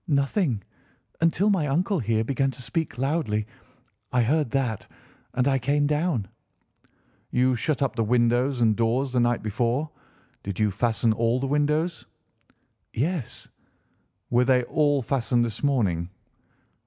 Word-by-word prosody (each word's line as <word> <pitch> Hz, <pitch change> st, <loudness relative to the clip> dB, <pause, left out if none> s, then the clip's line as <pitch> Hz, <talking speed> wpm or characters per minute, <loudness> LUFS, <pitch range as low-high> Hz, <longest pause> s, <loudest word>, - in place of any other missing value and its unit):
"Nothing, 140 Hz, -, +1 dB, 0.6 s
until 170 Hz, +5 st, +3 dB
my 175 Hz, -7 st, +1 dB
uncle 175 Hz, +7 st, +1 dB
here 110 Hz, -2 st, 0 dB
began 135 Hz, +3 st, 0 dB
to 130 Hz, -1 st, -8 dB
speak 160 Hz, -2 st, -3 dB
loudly. 135 Hz, -6 st, 0 dB, 0.7 s
I 125 Hz, -1 st, +3 dB
heard 150 Hz, +3 st, +1 dB
that, 125 Hz, -5 st, -2 dB, 0.5 s
and 125 Hz, +1 st, +2 dB
I 135 Hz, -1 st, +2 dB
came 145 Hz, +3 st, +1 dB
down." 150 Hz, -, 0 dB, 1.0 s
"You 125 Hz, +1 st, +2 dB
shut 140 Hz, +4 st, 0 dB
up 135 Hz, -, -1 dB
the 115 Hz, -, +1 dB
windows 120 Hz, +3 st, +2 dB
and 110 Hz, -2 st, +4 dB
doors 125 Hz, +4 st, 0 dB
the 125 Hz, -, +2 dB
night 120 Hz, -1 st, +1 dB
before. 120 Hz, +8 st, -1 dB, 0.5 s
Did 100 Hz, 0 st, -6 dB
you 105 Hz, -1 st, +2 dB
fasten 110 Hz, +1 st, +1 dB
all 115 Hz, +2 st, +1 dB
the 135 Hz, -, -2 dB
windows?" 150 Hz, +4 st, 0 dB, 0.8 s
"Yes." 150 Hz, +2 st, -3 dB, 0.8 s
"Were 120 Hz, +1 st, +4 dB
they 125 Hz, -1 st, +3 dB
all 145 Hz, 0 st, +1 dB
fastened 120 Hz, -1 st, +1 dB
this 115 Hz, -2 st, -5 dB
morning?" 100 Hz, -, 0 dB
125 Hz, 140 wpm, -25 LUFS, 115-145 Hz, 1.0 s, and